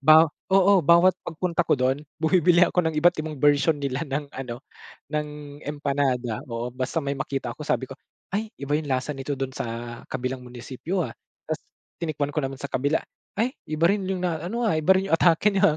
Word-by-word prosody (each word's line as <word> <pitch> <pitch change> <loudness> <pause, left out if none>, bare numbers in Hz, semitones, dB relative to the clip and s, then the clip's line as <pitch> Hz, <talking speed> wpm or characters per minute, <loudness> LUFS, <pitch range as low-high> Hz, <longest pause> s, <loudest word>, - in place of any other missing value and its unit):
baw 155 +3 +8 0.3
oo 195 0 +6
bawat 170 +4 +6
pagpunta 170 +1 -1
ko - - +3
do'n, 130 +2 +1 0.2
bumibili 175 +1 +4
ako 180 - +2
ng 160 - +1
iba't 175 +3 +4
ibang 155 -1 -5
bersyon 145 +2 +4
nila 140 +2 -2
ng 140 0 -3
ano 125 -2 -6 0.5
ng 150 -1 -4
empanada 140 -5 -1
oo 115 +1 -3
basta 130 +6 -2
may 140 0 -2
makita 135 -3 -3
ko - - -22
sabi 130 -2 0
ko, 135 - -9 0.4
"Ay 215 +2 -1
iba 145 +1 0
'yung 150 -1 -4
lasa 130 +3 0
nito 135 +2 -4
dun 135 0 -3
sa 120 0 -5
kabilang 125 +1 -2
munisipyo, 130 +9 -4
ah," - - -9 0.4
tapos 155 0 -2 0.4
tinikman 145 -3 -2
ko 155 - +3
naman 135 0 -4
sa 140 - -4
kabila, 145 +5 +1 0.4
"Ay 235 +5 +1 0.2
iba 155 +2 +2
rin 200 -2 0
'yung 190 -2 -1
na 165 -3 -1
ano, 230 +7 -3
ah, 210 -8 +2
iba 155 +4 +5
rin 195 +1 -1
yung 165 - +5
atake 170 +5 +4
niya 185 -6 +4
150 Hz, 200 wpm, -25 LUFS, 135-170 Hz, 0.5 s, baw